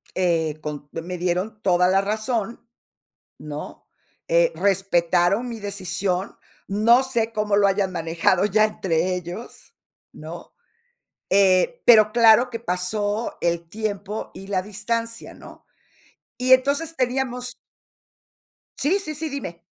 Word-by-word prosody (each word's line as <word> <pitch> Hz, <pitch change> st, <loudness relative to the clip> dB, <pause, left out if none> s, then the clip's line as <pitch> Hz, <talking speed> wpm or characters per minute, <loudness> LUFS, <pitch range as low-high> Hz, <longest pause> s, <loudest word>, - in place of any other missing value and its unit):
Eh, 165 Hz, -4 st, 0 dB
con 150 Hz, -1 st, -7 dB
me 165 Hz, -, -5 dB
me 180 Hz, +1 st, -6 dB
dieron 185 Hz, +5 st, -2 dB
toda 180 Hz, -1 st, +3 dB
la 190 Hz, +1 st, +3 dB
razón, 220 Hz, +2 st, -3 dB, 0.7 s
¿no?, 150 Hz, 0 st, -8 dB, 0.4 s
eh, -, -, +3 dB
respetaron 195 Hz, +3 st, +1 dB
mi 230 Hz, -, -6 dB
decisión. 190 Hz, -1 st, -3 dB, 0.3 s
No 220 Hz, +5 st, +4 dB
sé 235 Hz, -4 st, -1 dB
cómo 210 Hz, -2 st, 0 dB
lo 205 Hz, -, +4 dB
hayan 195 Hz, -1 st, 0 dB
manejado 170 Hz, +2 st, +1 dB
ya 210 Hz, +1 st, +3 dB
entre 185 Hz, -4 st, -1 dB
ellos, 180 Hz, +6 st, -9 dB, 0.4 s
¿no? -, -, -10 dB, 0.8 s
Eh, 195 Hz, -, +3 dB
pero 215 Hz, -3 st, +7 dB
claro 235 Hz, +1 st, +6 dB
que 230 Hz, -2 st, -6 dB
pasó 205 Hz, +3 st, -2 dB
el 170 Hz, -1 st, -1 dB
tiempo 210 Hz, 0 st, -4 dB
y 195 Hz, -, -11 dB
la 190 Hz, -2 st, -1 dB
distancia, 230 Hz, +3 st, -4 dB
¿no? -, -, -15 dB, 0.7 s
Y 255 Hz, +1 st, +4 dB
entonces 280 Hz, +5 st, +1 dB
teníamos 250 Hz, -1 st, -2 dB, 1.2 s
Sí, 345 Hz, +8 st, +1 dB
sí, 310 Hz, -6 st, -5 dB
sí, 315 Hz, +2 st, -4 dB
dime. 260 Hz, -, -6 dB
205 Hz, 125 wpm, -23 LUFS, 180-235 Hz, 1.2 s, pero